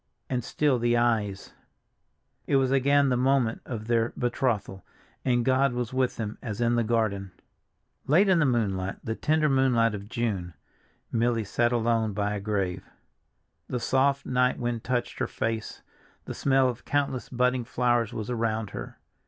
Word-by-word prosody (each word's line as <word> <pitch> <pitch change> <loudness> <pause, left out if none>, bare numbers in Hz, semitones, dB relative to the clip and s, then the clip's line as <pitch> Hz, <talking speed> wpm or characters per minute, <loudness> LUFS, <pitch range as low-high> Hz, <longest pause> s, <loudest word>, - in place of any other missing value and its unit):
And 125 -2 0
still 140 0 +1
the 120 0 +2
eyes— 110 -5 0 0.9
It 140 - +2
was 135 -1 +3
again 140 +1 +3
the 125 - +2
moment 130 -3 +1
of 110 -4 -5
their 115 0 +1
betrothal, 120 -6 -1 0.4
and 120 -2 +1
God 130 0 +3
was 125 +1 -3
with 130 -1 +1
them 110 -2 -5
as 105 -3 -5
in 120 0 +2
the 120 -1 +2
garden. 110 -4 0 0.8
LATE 175 +9 +5
in 185 -3 +4
the 150 - +3
moonlight, 100 -6 0
the 110 - -2
tender 155 +5 +1
moonlight 130 -5 +3
of 100 0 -7
June, 100 -8 -2 0.6
Milly 115 0 +1
sat 120 +4 +1
alone 115 -2 +1
by 105 0 -1
a 105 - -3
grave. 95 -3 -2 0.8
The 125 - -2
soft 135 +3 +1
night 125 0 +1
wind 120 -2 -3
touched 125 -1 -2
her - - 0
face, 115 -1 -4 0.4
the - - -5
smell 135 -1 +2
of 125 -1 -4
countless 140 -3 -1
budding 125 0 +1
flowers 120 -2 +1
was 110 +2 -5
around 110 -3 -1
her. - - -7
120 Hz, 160 wpm, -27 LUFS, 110-130 Hz, 0.9 s, LATE